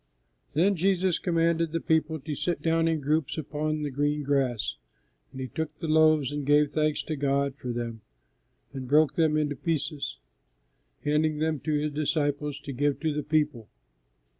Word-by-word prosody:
Then 190 +7 +3
Jesus 185 0 +2
commanded 165 -1 +1
the 165 - -1
people 160 0 +1
to 150 +3 -4
sit 170 +4 -2
down 165 0 +2
in 160 -2 0
groups 150 +1 0
upon 155 0 -2
the 145 - -2
green 145 +2 0
grass; 130 - 0 0.5
and 130 - -9
He 130 - -3
took 155 +4 -4
the 165 - -4
loaves 155 -3 +4
and 145 0 -3
gave 145 +1 +4
thanks 155 -1 0
to 155 - -3
God 140 -1 0
for 125 -3 -5
them, 115 -2 -4 0.7
and 130 -2 -6
broke 150 +3 +4
them 160 -2 +2
into 145 -1 0
pieces, 150 0 -2 0.9
handing 150 +1 +1
them 155 -1 0
to 155 - -2
His 150 0 0
disciples 145 -1 -1
to 140 -1 -6
give 145 +1 0
to 160 -2 0
the 150 - -1
people. 150 -7 0
150 Hz, 170 wpm, -27 LUFS, 140-160 Hz, 0.9 s, loaves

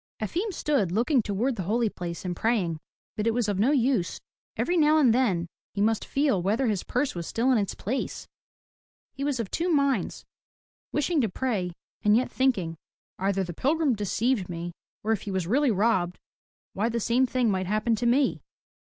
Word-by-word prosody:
Efim 350 - -2
stood 285 - 0
looking 245 - +2
toward 225 +5 -1
the - - -2
holy 230 +1 +2
place 175 -3 -6
and 180 -1 -2
praying, 185 -7 0 0.4
but 210 +1 -1
it 230 - +2
was 240 -3 +1
of 200 -2 -1
no 225 +6 +4
use. 255 -9 +1 0.4
Every 355 - +1
now 310 -2 +5
and 260 -7 +5
then 205 -9 +2 0.3
he - - -3
must 220 +1 +2
feel 275 -9 +1
whether 215 +9 +1
his 210 -6 0
purse 260 +3 -1
was 170 -2 -5
still 245 +4 +1
in 245 - +4
its 200 -2 -2
place. 255 +7 -3 0.9
He 275 - -5
was 280 -3 0
of 220 -5 -3
two 345 +2 0
minds, 280 -4 +1 0.7
wishing 300 +1 +1
to 225 - +1
pray 190 -5 -2 0.3
and 210 +1 +4
yet 255 - 0
thinking, 195 -12 0 0.4
"Either 195 0 +1
the 175 -1 -5
pilgrim 290 - +1
deceived 210 0 0
me, 170 0 -4 0.3
or 220 - 0
if 220 - +1
he - - -6
was 190 -2 -1
really 265 - +2
robbed, 190 -4 +1 0.6
why 215 +4 0
the 235 0 -1
same 245 +4 +2
thing 245 -3 +1
might 185 -1 -1
happen 215 +3 +1
to 240 +2 0
me.'' 265 +3 +2
225 Hz, 190 wpm, -27 LUFS, 195-265 Hz, 0.9 s, now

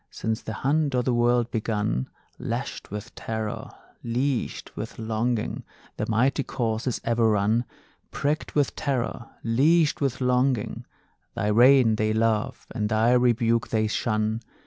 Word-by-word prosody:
Since 110 0 -3
the 110 - -6
hunt 140 +3 +1
o' 125 - +2
the 125 - +1
world 120 0 +2
begun, 105 - -1 0.3
Lashed - - -4
with 105 +3 -7
terror, 110 -1 -4 0.3
leashed 125 +2 -2
with - - -6
longing, 115 +1 -2 0.3
The - - -2
mighty 125 +6 +2
course 115 -3 -2
is 125 - -1
ever 115 -1 +2
run; 110 +3 +2 0.4
Pricked 150 +3 -2
with 145 -3 +1
terror, 125 -4 -2
leashed 150 +8 +3
with 135 -2 0
longing, 125 -2 0 0.5
Thy 105 - 0
rein 120 0 +6
they 110 0 +1
love, 110 -1 0
and 105 -3 -1
thy 110 +2 +3
rebuke 115 -2 +3
they 110 -1 +1
shun. 110 0 -1
115 Hz, 140 wpm, -25 LUFS, 110-125 Hz, 0.5 s, rein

